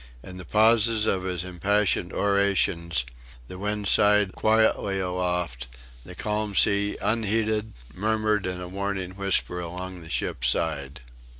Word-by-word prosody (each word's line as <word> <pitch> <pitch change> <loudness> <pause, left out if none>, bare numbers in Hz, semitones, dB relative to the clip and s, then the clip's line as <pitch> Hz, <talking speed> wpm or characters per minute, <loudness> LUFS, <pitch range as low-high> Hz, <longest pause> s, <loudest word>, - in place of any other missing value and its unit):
In 90 -1 -10
the 90 - -8
pauses 110 0 +3
of 95 -3 0
his 90 -2 -2
impassioned 95 0 0
orations 95 -8 +1 0.4
the 90 - -9
wind 105 0 -2
sighed 105 -1 +4
quietly 110 -3 +2
aloft, 90 -8 -2 0.4
the - - -11
calm 105 -1 -3
sea 100 0 +3
unheeded 110 0 0 0.2
murmured 110 0 0
in 90 0 -4
a 90 - -6
warning 95 0 -4
whisper 95 -2 0
along 90 +1 -7
the 80 - -12
ship's - - -1
side. 70 -2 -1
100 Hz, 130 wpm, -25 LUFS, 90-105 Hz, 0.4 s, sighed